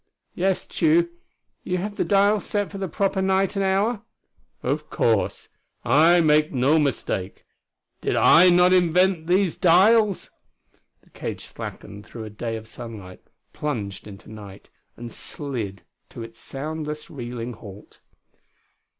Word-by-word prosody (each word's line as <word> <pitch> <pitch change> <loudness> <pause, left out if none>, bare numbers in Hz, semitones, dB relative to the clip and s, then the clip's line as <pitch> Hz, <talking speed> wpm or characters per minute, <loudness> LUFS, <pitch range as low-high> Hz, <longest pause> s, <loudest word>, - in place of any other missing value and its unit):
"Yes, 190 0 0
Tugh. 170 +1 +2 0.5
You 180 - -1
have 205 +3 -4
the - - 0
dial 205 +1 +3
set 205 0 -2
for 195 - -7
the 190 - -2
proper 195 +2 -1
night 190 +1 +1
and 195 - 0
hour?" 200 +4 +1 0.6
"Of - - -2
course. - - 0 0.4
I 160 +8 +5
make 155 -1 +3
no 140 +4 +3
mistake. 110 -9 -2 0.6
Did - - -1
I 180 +2 +7
not 180 +1 +5
invent 180 -1 +3
these 185 -1 +2
dials?" 200 +4 +4 0.7
The - - -27
cage - - -6
slackened 100 0 -9
through 115 - -8
a 110 - -8
day 115 +2 -4
of 110 0 -8
sunlight; 110 -6 -9 0.3
plunged 105 -11 -4
into 100 -2 -12
a - - -11
night; 100 -2 -12 0.3
and 120 0 -8
slid 115 -11 -5 0.3
to 115 - -8
its 115 0 -11
soundless, 150 +2 -6
reeling 120 -3 -6
halt.... 105 -2 -13
155 Hz, 140 wpm, -23 LUFS, 115-190 Hz, 0.7 s, I